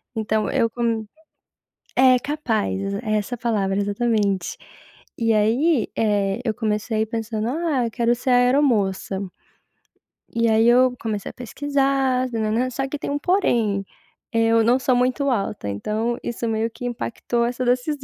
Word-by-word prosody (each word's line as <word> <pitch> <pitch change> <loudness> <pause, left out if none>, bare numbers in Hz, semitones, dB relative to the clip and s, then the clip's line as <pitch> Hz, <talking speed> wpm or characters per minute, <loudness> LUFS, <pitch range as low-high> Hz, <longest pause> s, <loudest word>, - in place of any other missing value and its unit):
então 220 -1 0
eu 240 -4 +2
com 230 -2 -1 0.9
é 255 0 +6
capaz, 220 -8 -2
é 215 -2 0
essa 210 +4 -4
a - - -24
palavra, 205 -5 0
exatamente. 205 -2 0 0.6
E 230 -1 +2
aí, 230 +5 +2
eh, 205 0 +1
eu 225 - 0
comecei 215 0 -1
pensando: 225 0 -3
"Ah, 300 -2 0
eu 230 - -4
quero 235 +1 +2
ser 245 +2 -3
aeromoça". 245 -7 +2 1.2
E 230 0 +2
aí 220 +1 +4
eu 250 +1 +5
comecei 215 -3 -3
a - - -29
pesquisar, 270 0 0
nã-nã-nã, 225 +3 0
só 270 +2 -2
que 290 +2 -5
tem - - -4
um 285 - 0
porém, 235 - +1 0.5
eu 230 0 +3
não 240 +3 +4
sou 255 0 +2
muito 255 +3 +1
alta, 205 - -2
então 215 - -2
isso 235 0 -3
meio 225 0 0
que 245 - -8
impactou 235 0 -2
essa 245 +1 -2
decisão. 255 +4 0
230 Hz, 150 wpm, -22 LUFS, 215-255 Hz, 1.2 s, é